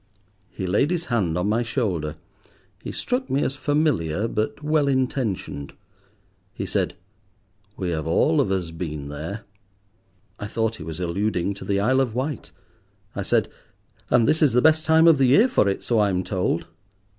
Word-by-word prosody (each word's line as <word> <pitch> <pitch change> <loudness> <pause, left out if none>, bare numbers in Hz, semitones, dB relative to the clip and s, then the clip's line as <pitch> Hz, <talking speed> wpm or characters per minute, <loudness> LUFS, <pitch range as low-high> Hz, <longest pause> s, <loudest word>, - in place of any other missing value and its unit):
He 95 - -5
laid 105 - +2
his 175 -1 -1
hand 90 -8 +1
on 90 +3 0
my 110 +3 +1
shoulder. 100 - -2 0.7
He - - -6
struck 250 +2 -2
me 140 - +1
as 135 - -1
familiar, 135 - 0
but 110 +7 -3
well 150 -1 +2
intentioned. 125 - -2 0.8
He - - -4
said— - - -1 0.8
"We 90 -2 -2
have 80 -1 -3
all 150 - +3
of 110 - -1
us 90 -4 -1
been 75 -4 -5
there." 80 +9 -6 1.0
I 105 - -4
thought 110 +1 -1
he - - -8
was 80 +2 -6
alluding 90 +2 -1
to 100 - -10
the 100 -1 0
Isle 130 +6 +2
of 120 -4 -2
Wight. 135 +1 -3 0.6
I - - -2
said— - - +1 0.6
"And 115 -2 +4
this 155 +2 +2
is 145 -6 +4
the 125 - +5
best 160 0 +4
time 160 +1 +6
of 160 -4 +6
the 135 - +4
year 205 - +6
for 240 - +2
it, 95 - -3
so 115 -2 +1
I'm 95 -3 +2
told." 90 -3 -1
110 Hz, 175 wpm, -23 LUFS, 90-140 Hz, 1.0 s, time